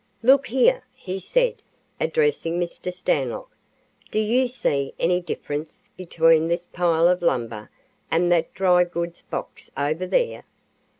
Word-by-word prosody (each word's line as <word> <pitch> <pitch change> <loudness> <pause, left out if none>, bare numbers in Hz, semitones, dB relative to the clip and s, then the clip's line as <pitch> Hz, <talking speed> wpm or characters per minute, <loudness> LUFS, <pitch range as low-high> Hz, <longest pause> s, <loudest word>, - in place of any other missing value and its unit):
"Look 270 +3 +5
here," 385 - +3
he 190 +1 -5
said, - - 0 0.4
addressing 445 - 0
Mr. 175 +1 -4
Stanlock. 140 -8 -2 0.5
"Do - - -3
you 235 +4 +2
see 140 - -2
any 180 +1 +2
difference 155 -2 -6
between 165 -2 +3
this 170 +1 -1
pile 170 -1 +2
of 180 0 +2
lumber 115 -9 -1 0.4
and 175 +2 +2
that 170 -2 +2
dry 180 -2 +4
goods 170 -1 -5
box - - -7
over 155 +6 -1
there?" 480 - 0
175 Hz, 130 wpm, -23 LUFS, 165-195 Hz, 0.5 s, Look